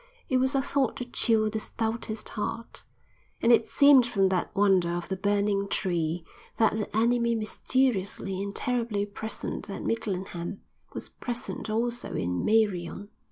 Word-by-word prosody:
It 260 - +3
was 260 +2 +2
a 270 - +2
thought 270 -3 0
to 250 - -4
chill 220 -3 +2
the 220 - -2
stoutest 225 0 -3
heart. 230 +2 -4 0.5
And 235 - +4
it 230 -1 +5
seemed 280 -4 +6
from 195 -5 +2
that 185 -2 0
wonder 195 -3 +4
of 175 0 -4
the 190 - -1
burning 200 +1 +1
tree, 170 -3 -1 0.3
that 220 -2 +4
the 215 0 -3
enemy 235 +1 +3
mysteriously 215 -4 0
and 200 0 -4
terribly 235 -5 0
present 215 +1 -5
at 195 - -5
Midlingham, 195 -4 -3 0.3
was - - -5
present 240 -2 -5
also 235 +2 -1
in 90 +1 -1
Meirion. 205 -3 +1
215 Hz, 150 wpm, -28 LUFS, 195-235 Hz, 0.5 s, seemed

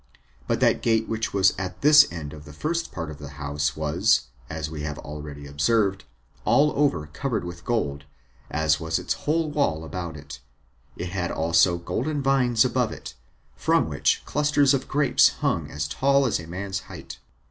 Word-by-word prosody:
But - - 0
that - - +3
gate 110 -1 +1
which 110 0 -2
was 95 -1 +4
at 90 -1 -5
this 150 0 +7
end 80 -4 -6
of 75 -1 -11
the 75 - -11
first 165 - -2
part 80 -3 -5
of 75 - -10
the 75 - -8
house 75 0 -2
was, 80 - +2 0.2
as 80 0 -4
we 75 -1 -6
have 75 -1 -4
already 75 -1 -8
observed, 95 +8 +1 0.4
all 140 +7 +4
over 140 - +1
covered 110 - -3
with 85 0 -8
gold, 75 - -2 0.4
as 80 0 +1
was 80 0 -1
its - - -1
whole 155 0 -1
wall 90 - 0
about 85 -2 -5
it; 70 -1 -10 0.6
it 90 - -4
had 90 -2 -2
also 85 +2 +3
golden 140 - -2
vines 130 -3 +3
above 125 -2 0
it, - - -8 0.4
from - - +2
which - - +1
clusters 145 -1 +3
of 135 -1 -1
grapes 140 -3 +4
hung - - -2
as 75 0 -3
tall 140 - +2
as 120 - +1
a 85 - -9
man's 95 +3 -4
height. - - -10
90 Hz, 180 wpm, -25 LUFS, -, 0.6 s, this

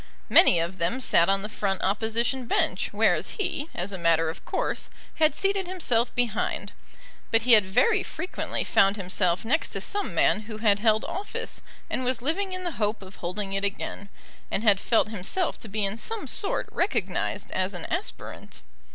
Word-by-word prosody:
Many 175 - +7
of 170 +3 -2
them 175 +10 0
sat 170 -8 +4
on 195 0 +2
the - - -2
front 195 -3 -2
Opposition 225 +5 0
bench, - - 0
whereas - - +1
he, 340 -6 -2
as 180 +3 -2
a 190 - -5
matter 165 -1 +2
of - - -13
course, - - 0 0.3
had 310 -1 +3
seated 390 -1 0
himself 250 -11 0
behind. 240 -3 -1 0.6
But 225 0 +2
he 250 - +2
had 210 -4 +7
very 415 - +3
frequently 365 -1 -4
found 195 +1 +3
himself 185 -1 0
next 310 +8 +1
to - - -2
some 410 0 -2
man - - +3
who 215 - -5
had 210 -2 +3
held 215 0 +2
office 390 +3 -4 0.3
and 255 - -2
was 255 -1 0
living 375 +7 -1
in 370 0 -4
the 345 -7 -4
hope 210 0 0
of 190 +1 -13
holding 195 +3 -4
it 195 0 -1
again, 200 0 -4 0.4
and 205 - -1
had 205 -4 +5
felt 225 -1 +2
himself 220 - -1
to - - -7
be 210 0 -1
in 200 +3 -3
some 450 - -3
sort 405 - -2
recognised - - -1
as 185 +1 -1
an 175 - -4
aspirant. 365 +5 -6
220 Hz, 185 wpm, -26 LUFS, 195-310 Hz, 0.6 s, Many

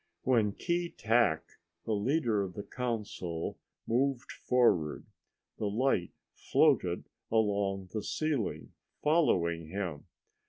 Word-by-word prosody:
When 115 -5 +3
Keetack, 120 - +1 0.4
the 110 - 0
leader 115 0 +1
of 95 -3 -4
the 100 - -5
council, 105 -10 -4 0.3
moved 130 +2 0
forward, 105 -12 +2 0.5
the 105 - 0
light 105 -5 +1 0.2
floated - - +2 0.3
along 100 -3 +1
the 110 - -1
ceiling 150 -2 -2 0.3
following 85 - +2
him. 90 -4 -4
110 Hz, 95 wpm, -31 LUFS, 95-125 Hz, 0.5 s, When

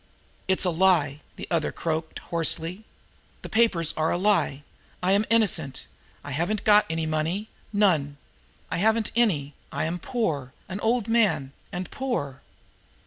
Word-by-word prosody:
"It's 190 0 +2
a 180 - +2
lie!" 160 -5 +3
the - - -7
other 165 -3 +1
croaked 160 -1 -3 0.2
hoarsely. 170 +4 0 0.6
"Those - - -8
papers 220 -8 +2
are 160 +1 +1
a - - +1
lie! 185 -7 +2 0.4
I 185 - +3
am 205 +2 +3
innocent. 180 -12 +1 0.4
And - - -7
I - - -2
haven't 200 +7 -1
got 210 0 +5
any 160 0 -1
money. 160 +7 -1 0.2
None! 165 -9 +2 0.5
I - - 0
haven't 220 +3 +2
any. 160 -12 +2 0.2
I - - -1
am 170 +2 -2
poor 155 - -2
an 190 +1 -5
old 230 0 +1
man 210 - +2 0.2
and 180 0 -5
poor." 190 - -3
180 Hz, 150 wpm, -26 LUFS, 155-210 Hz, 0.6 s, got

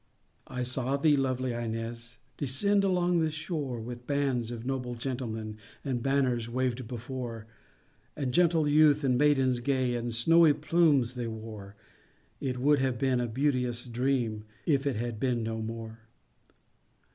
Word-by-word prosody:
I 125 - -3
saw 130 +2 0
thee, 150 +1 +4
lovely 130 -2 0
Ines, 115 0 -5 0.2
Descend 195 +10 +1
along 180 -2 +2
the 160 -1 +2
shore, 150 -5 -3
With 120 +2 -8
bands 135 -5 0
of 120 -1 -6
noble 125 -2 -3
gentlemen, 115 -4 -4 0.3
And 130 -3 -1
banners 130 -3 +1
waved 125 0 -1
before; 120 -1 -6 0.7
And 135 -4 -2
gentle 165 -1 +3
youth 150 0 +5
and 130 -2 +3
maidens 135 -2 +3
gay, 130 -1 0
And 120 0 -2
snowy 160 +7 +5
plumes 150 -5 +2
they 120 -2 -4
wore; 110 -3 -8 0.6
It 130 -2 -2
would 145 +3 +3
have 130 -2 0
been 130 0 +1
a 120 - -1
beauteous 125 -1 0
dream, 120 -3 -1 0.2
If 140 -2 +2
it 135 - 0
had 115 0 -3
been 120 -2 0
no 110 0 -3
more! 115 0 -6
125 Hz, 145 wpm, -29 LUFS, 120-140 Hz, 0.7 s, youth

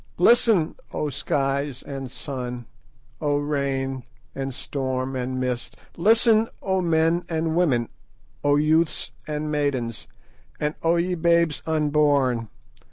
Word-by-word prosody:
Listen, 225 -8 +4 0.2
O 150 -1 -2
skies 140 -1 -1
and 135 -2 -6
sun, 125 -3 -6 0.6
O 145 -2 +1
rain 135 -2 -1 0.3
and 135 0 -3
storm 130 0 -3
and 130 0 -2
mist! 125 -1 -3 0.2
Listen, 220 +4 +4 0.2
O 190 -1 +1
men 165 0 +2
and 160 -1 -1
women, 135 -10 +2 0.6
O 145 0 +4
youths 155 +2 +2 0.2
and 150 0 -3
maidens, 130 -7 -1 0.5
and 150 0 0
O 165 +1 +3
ye 175 +2 +1
babes 170 -2 +2
unborn! 145 -7 +2
145 Hz, 115 wpm, -24 LUFS, 135-165 Hz, 0.6 s, Listen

